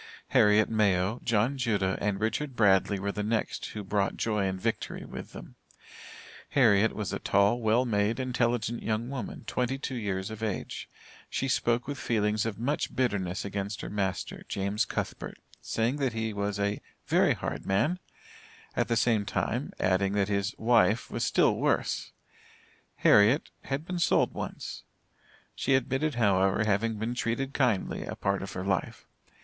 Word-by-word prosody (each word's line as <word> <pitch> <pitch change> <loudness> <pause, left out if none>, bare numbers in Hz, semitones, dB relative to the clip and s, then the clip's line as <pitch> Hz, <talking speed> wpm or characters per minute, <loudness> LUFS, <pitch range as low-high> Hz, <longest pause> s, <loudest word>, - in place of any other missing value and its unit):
Harriet 105 +1 +5
Mayo, 100 0 +1
John 120 +5 +1
Judah, 100 -6 +1
and 100 -1 0
Richard 125 +5 -1
Bradley 100 -2 +3
were 100 +1 -1
the 105 - -3
next 110 +1 -1
who 105 - -6
brought 100 0 0
joy 105 -3 0
and 95 0 -3
victory 115 +2 -3
with - - -8
them. - - -10 1.0
Harriet 110 -5 +4
was 105 -3 -3
a - - -2
tall, 100 +4 +3
well 115 +3 +3
made, 110 +1 +1
intelligent 120 -2 0
young 110 +3 -2
woman, 130 -6 -5
twenty 125 +1 -1
two 135 - -5
years 100 -4 -3
of 110 0 -8
age. 110 -3 -4 0.4
She 135 - -1
spoke 120 -1 +1
with 145 -2 -4
feelings 105 -1 +1
of 110 - -4
much 140 +6 -2
bitterness 100 -8 -1
against 100 +1 -4
her - - -6
master, 95 -3 -2
James 100 +2 0
Cuthbert, - - -4 0.2
saying 115 +5 0
that 135 -5 0
he 110 -1 -2
was 100 0 -2
a 100 +1 -1 0.2
"very - - +3
hard - - -5
man," 145 - +1 0.8
at - - +1
the 115 - +1
same 115 -3 +3
time, - - -2
adding 95 +1 +2
that 100 -1 +1
his 100 +1 -1
"wife 115 -1 +3
was - - -2
still - - +3
worse." - - 0 0.8
Harriet 110 +8 +4
"had 140 +3 -3
been 180 0 -3
sold 170 - +3
once." - - -6 0.7
She 135 - +1
admitted 135 +3 0
however, 100 -2 +3
having 110 +2 +1
been 110 +3 -2
treated 125 +3 -2
kindly 120 -8 0
a - - -5
part 100 0 -1
of 95 0 -6
her 90 +1 -4
life. 95 -2 -2
110 Hz, 160 wpm, -29 LUFS, 100-120 Hz, 1.0 s, Harriet